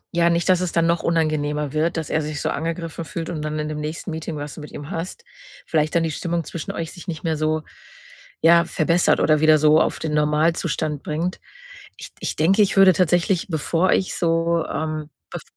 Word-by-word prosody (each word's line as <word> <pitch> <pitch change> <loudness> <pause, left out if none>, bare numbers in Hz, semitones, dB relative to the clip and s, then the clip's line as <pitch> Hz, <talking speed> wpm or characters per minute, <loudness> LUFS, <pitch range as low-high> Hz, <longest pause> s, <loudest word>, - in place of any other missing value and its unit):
ja, 170 0 +3
nicht, 170 0 0
dass 185 -1 +4
es 180 -2 -2
dann 170 -1 +2
noch 170 0 +1
unangenehmer 150 -3 0
wird, 160 +3 0
dass 160 -2 -4
er 155 - +1
sich 150 -1 -4
so - - -1
angegriffen 165 +1 -4
fühlt 160 +2 -5
und 155 -3 -4
dann 155 0 -3
in 150 0 -2
dem 150 0 -4
nächsten 155 +4 -5
Meeting, 160 0 -5
was 145 0 -6
du - - -10
mit 150 - -10
ihm 145 +2 -8
hast, 185 - -5 0.4
vielleicht 155 -1 0
dann 170 - +3
die 165 - -1
Stimmung 170 +2 -2
zwischen 165 +1 -6
euch 165 -1 -5
sich 175 - -12
nicht 160 -3 -4
mehr 160 -1 0
so 155 +1 0 0.8
ja, 170 +1 +6
verbessert 170 +2 +2
oder 155 -1 +3
wieder 155 0 +6
so 155 +1 +5
auf - - 0
den 155 -2 -3
Normalzustand 150 0 0
bringt. 165 +4 -3 0.6
Ich - - -10
ich - - -3
denke, 190 +7 +4
ich 200 - +1
würde 195 -1 +7
tatsächlich, 175 +2 +1
bevor 165 +2 +1
ich 185 - +1
so, 165 -1 +1
ähm, 155 -1 -4 0.2
bef - - -6
160 Hz, 210 wpm, -22 LUFS, 155-170 Hz, 0.8 s, würde